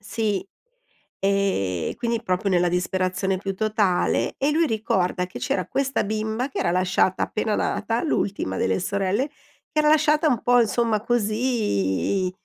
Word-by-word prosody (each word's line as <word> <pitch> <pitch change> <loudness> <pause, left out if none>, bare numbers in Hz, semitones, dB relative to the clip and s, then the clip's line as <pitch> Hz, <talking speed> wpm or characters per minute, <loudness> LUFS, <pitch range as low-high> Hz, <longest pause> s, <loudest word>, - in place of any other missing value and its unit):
Sì. 205 -2 -2 0.7
E 190 - 0
quindi 235 -1 -2
proprio 185 +2 -1
nella 175 -1 +3
disperazione 185 +1 -1
più 195 0 -4
totale. 210 -3 +1
E 280 +2 +1
lui 325 +1 +3
ricorda 190 -5 0
che 180 - -9
c'era 280 - -1
questa 275 -4 0
bimba 220 +4 -2
che - - -5
era 170 - +1
lasciata 185 +1 +1
appena 215 -1 -1
nata, 230 +1 -1
l'ultima 195 - -1
delle 95 0 +1
sorelle, 200 +8 -1 0.4
era 305 -1 +3
lasciata 305 0 +4
un 245 -5 0
po' 245 0 +4
insomma 225 0 +1
così, 215 - 0
205 Hz, 140 wpm, -24 LUFS, 185-240 Hz, 0.7 s, lasciata